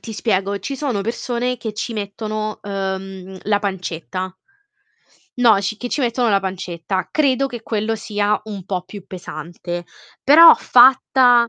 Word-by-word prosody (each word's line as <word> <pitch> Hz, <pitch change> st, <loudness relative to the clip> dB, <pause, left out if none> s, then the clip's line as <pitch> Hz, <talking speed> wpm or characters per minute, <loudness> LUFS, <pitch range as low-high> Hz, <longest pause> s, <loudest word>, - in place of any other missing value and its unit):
ti 225 Hz, -, -8 dB
spiego, 200 Hz, -2 st, -1 dB
ci 270 Hz, +8 st, -5 dB
sono 260 Hz, -7 st, -2 dB
persone 240 Hz, +3 st, -2 dB
che 220 Hz, -3 st, -5 dB
ci 220 Hz, +3 st, -4 dB
mettono, 215 Hz, +1 st, -4 dB
uhm, 190 Hz, -1 st, -5 dB
la 205 Hz, -1 st, +2 dB
pancetta. 185 Hz, -2 st, -4 dB, 1.0 s
No, 235 Hz, -3 st, +6 dB
c 205 Hz, +2 st, -3 dB
che 245 Hz, -, -4 dB
ci 290 Hz, -, -2 dB
mettono 240 Hz, 0 st, +1 dB
la 200 Hz, -2 st, +3 dB
pancetta. 185 Hz, -1 st, -4 dB
Credo 275 Hz, -3 st, +2 dB
che 240 Hz, -4 st, -8 dB
quello 220 Hz, 0 st, -1 dB
sia 210 Hz, -1 st, -1 dB
un 205 Hz, -4 st, -7 dB
po' 185 Hz, -2 st, -2 dB
più 195 Hz, 0 st, -11 dB
pesante, 175 Hz, 0 st, -7 dB, 0.4 s
però 320 Hz, +5 st, +9 dB
fatta 245 Hz, -1 st, +5 dB
210 Hz, 145 wpm, -20 LUFS, 190-240 Hz, 1.0 s, però